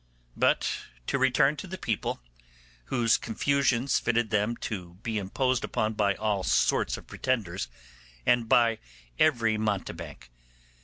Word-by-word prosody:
But - - +2 0.3
to 140 - 0
return 135 +3 +3
to 195 - -7
the 190 +1 -6
people, 110 - -2 0.6
whose 115 -3 +2
confusions 135 +2 +1
fitted 120 -1 0
them 105 +2 +1
to 90 -5 -5
be 110 -2 -1
imposed 125 +6 0
upon 110 0 -1
by 100 -2 +1
all 105 -2 0
sorts - - +2
of - - -12
pretenders 100 -8 -2 0.6
and 120 -2 +3
by 115 -2 +4 0.4
every 115 -7 +3
mountebank. 100 - -4
115 Hz, 125 wpm, -28 LUFS, 105-130 Hz, 0.6 s, by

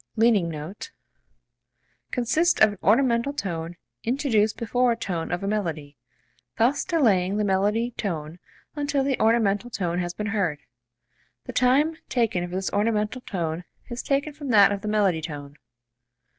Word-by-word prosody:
leaning 220 -6 +3
note) 160 +5 -7 1.2
consists 315 +8 +1
of 220 -1 +6
an 205 - -9
ornamental 240 +1 +3
tone 170 - -4 0.3
introduced 230 -4 +1
before 245 +2 +1
a - - +1
tone 175 -8 -4
of 175 +2 -2
a - - -2
melody, 165 -9 -3 0.6
thus 250 +6 +2
delaying 205 - +2
the 210 - +1
melody 205 +4 +1
tone 165 -6 -4 0.4
until 285 -2 0
the 270 -2 0
ornamental 220 0 +2
tone 180 -6 -2
has 175 -1 -3
been 210 - -4
heard. 180 -8 0 0.9
The - - -8
time 285 +6 +3
taken 225 -8 +1
for 180 - -6
this 190 0 -2
ornamental 210 +3 0
tone 170 -5 -3 0.3
is 240 - -3
taken 280 +2 -1
from 290 -1 -8
that 205 -4 +6
of 200 -1 -2
the 215 - -5
melody 200 -6 +2
tone. 145 -3 -7
210 Hz, 150 wpm, -25 LUFS, 180-245 Hz, 1.2 s, of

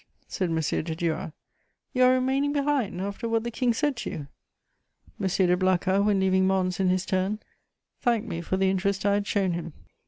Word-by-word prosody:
said 185 -3 -2
M. 165 - 0
de 160 +1 -1
Duras. 165 -1 -2 0.6
"You 255 -1 +4
are 255 - +6
remaining 265 +3 +1
behind, 280 -10 0
after 200 +4 -4
what 225 -1 +1
the 235 - -3
King 245 +1 +1
said 290 +4 0
to 225 - -4
you?" 145 -2 -6 0.9
M. 195 - 0
de 180 -1 +3
Blacas, 185 +1 +2
when 205 -1 +2
leaving 190 0 +3
Mons 185 -1 0
in 190 -1 +2
his 185 0 +1
turn, 190 +3 0 0.6
thanked 235 -2 +1
me 170 -5 -4
for 185 +3 -2
the 190 0 +2
interest 195 +1 -1
I 200 - +4
had 205 0 0
shown 195 -3 +1
him. 170 -2 -4
195 Hz, 195 wpm, -26 LUFS, 185-230 Hz, 0.9 s, are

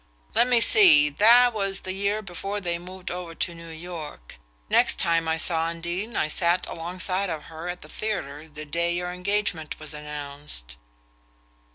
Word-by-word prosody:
Let 245 - +4
me 245 -2 +3
see 160 -11 +6
that 235 +9 +6
was 195 -2 -1
the 185 - -4
year 200 +2 -1
before 195 +2 -5
they 175 -3 -2
moved 185 +1 -8
over 175 -2 -6
to 170 - -2
New 165 0 -11
York. 160 - -9 0.3
Next - - +4
time 165 -1 +2
I 160 0 +1
saw 165 0 +4
Undine 175 +6 -4
I - - +1
sat 170 +3 +1
alongside 185 +3 -1
of 155 -3 -4
her 165 +2 -8
at 180 0 -6
the - - -12
theatre 160 -8 -5
the 155 0 -9
day 170 +3 -1
your 180 0 -3
engagement 180 -4 -2
was 155 -1 -6
announced." 145 - -5
170 Hz, 170 wpm, -25 LUFS, 160-190 Hz, 0.3 s, see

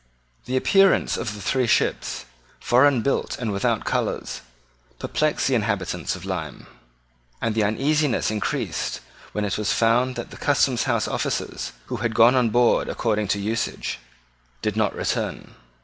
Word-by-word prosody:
The 130 +1 -1
appearance 195 +8 +4
of 110 -3 -4
the 105 - -9
three 125 +5 +1
ships, 110 - 0 0.3
foreign 125 -1 +4
built 140 - -1
and 115 -4 -2
without 100 0 0
colours, - - -2 0.6
perplexed 155 - 0
the 135 - +1
inhabitants 100 -7 -1
of 90 0 -9
Lyme; 80 -7 -5 0.7
and 115 - -1
the 110 - +1
uneasiness 140 +5 +1
increased 105 -1 -2 0.3
when 105 0 -1
it 100 +1 -2
was 105 - 0
found 120 +3 +2
that 120 - -6
the - - -10
Customhouse - - +1
officers, - - -3
who - - -4
had 115 -2 -2
gone 115 +2 +7
on 125 -3 +3
board 120 +2 +3
according 105 -3 0
to 100 - 0
usage, 110 - -2 0.6
did - - -1
not - - +1
return. - - -3
115 Hz, 150 wpm, -23 LUFS, 105-125 Hz, 0.7 s, gone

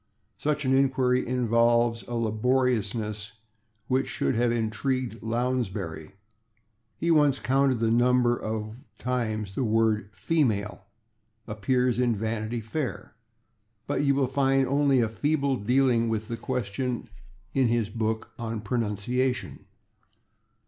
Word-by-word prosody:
Such 150 +1 -1
an 130 - +2
inquiry 130 -1 +2
involves 120 -1 +2
a 120 - -4
laboriousness 110 -2 0 0.5
which 130 +1 +1
should - - -1
have 120 0 +2
intrigued 115 +1 -2
Lounsbury: 110 -9 -2 0.8
he 170 +1 0
once 145 -4 +4
counted 135 -2 +2
the 115 0 +1
number 120 0 +3
of 110 0 -4 0.2
times 110 -5 -2
the 130 - -1
word 110 -2 +1
/female/ 110 -10 0 0.7
appears 125 +3 0
in 120 -2 +2
"Vanity 110 +2 -3
Fair." 125 +5 -4 0.7
But - - -1
you 140 -1 +3
will 135 -1 +2
find 135 +1 +2
only 140 -1 +3
a 115 - +2
feeble 140 +4 0
dealing 120 0 +2
with 110 0 -2
the 115 - -3
question 125 0 -3 0.5
in 135 -2 +3
his 115 -2 0
book 110 0 -2
on 115 -2 -3
pronunciation. 115 +1 -2
120 Hz, 120 wpm, -27 LUFS, 110-130 Hz, 0.8 s, once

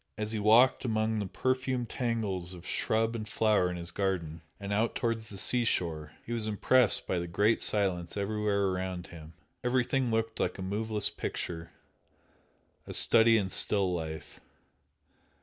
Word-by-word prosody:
As 105 0 -3
he 110 - -2
walked 115 +5 +4
among 110 -2 0
the 100 - -3
perfumed 130 +2 -2
tangles 105 -8 -3
of 85 +1 -13
shrub 115 +1 0
and 110 -2 -5
flower 105 -3 +2
in 90 - -5
his 85 0 -7
garden, 85 -5 -2 0.2
and 100 0 -4
out 110 +3 0
towards 115 -2 -2
the 100 - -9
sea 120 +5 +4
shore 80 -8 -1
he 120 - -5
was 115 -2 -1
impressed 110 +3 +3
by 90 - -1
the 85 - -4
great 105 +6 +1
silence 95 -4 0
everywhere 100 -1 0
around 90 -1 -4
him. 80 -1 -12 0.3
Everything 125 +1 0
looked 115 0 -2
like 90 - -1
a 95 - -6
moveless 105 +2 -1
picture 85 -1 -5 1.2
a - - -6
study 115 0 +6
in 95 -3 -2
still 95 -3 +3
life. 80 -2 -6
105 Hz, 160 wpm, -29 LUFS, 90-115 Hz, 1.2 s, study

